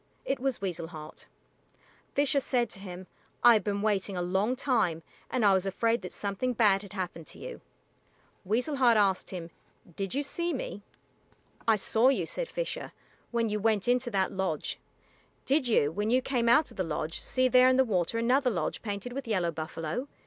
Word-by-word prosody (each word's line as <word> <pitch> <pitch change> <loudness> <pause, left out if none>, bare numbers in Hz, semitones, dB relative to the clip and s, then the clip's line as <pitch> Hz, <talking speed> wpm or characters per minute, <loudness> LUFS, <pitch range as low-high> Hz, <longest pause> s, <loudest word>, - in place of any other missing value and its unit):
It 270 - -1
was 265 -4 -1
Weasel 175 -4 -3
Heart. 155 -2 -10 0.9
Fisher 285 0 +4
said 245 -4 0
to - - -9
him, 185 -1 -8 0.4
"I 240 - +9
have 215 -3 +2
been 200 +1 -2
waiting 200 -2 0
a - - -1
long 195 +7 +1
time, 225 - 0 0.3
and 245 -4 +1
I 200 - +6
was 190 0 +1
afraid 230 +4 +1
that - - -7
something 205 +5 -2
bad 210 -4 +4
had 200 -2 -11
happened 175 -4 -5
to - - -11
you." - - -8 0.8
Weasel 245 +9 0
Heart 240 -4 +5
asked 195 -3 +2
him, 170 -3 -7 0.4
"Did 195 +4 -3
you 285 - 0
see 340 +4 -2
me?" 205 - -5 0.9
"I 225 - +6
saw 220 +4 +3
you," 270 - +1
said - - -3
Fisher, - - -4 0.4
"when 230 -2 0
you 210 0 -1
went 215 -1 +1
into 245 0 +2
that 195 -4 0
lodge. 190 -6 -2 0.7
Did 275 -1 +2
you, 150 -10 +3
when 205 +5 -2
you 250 +2 +4
came 240 -4 +1
out 295 +6 +4
of - - -15
the 185 - 0
lodge, 160 0 -3
see 255 0 +1
there 255 0 +6
in 260 - +3
the 265 - +5
water 190 -1 0
another 250 +3 +3
lodge 170 -9 -2
painted 205 +3 -5
with 270 -1 -5
yellow 185 -6 +1
buffalo? 160 - -4
215 Hz, 190 wpm, -29 LUFS, 190-255 Hz, 0.9 s, I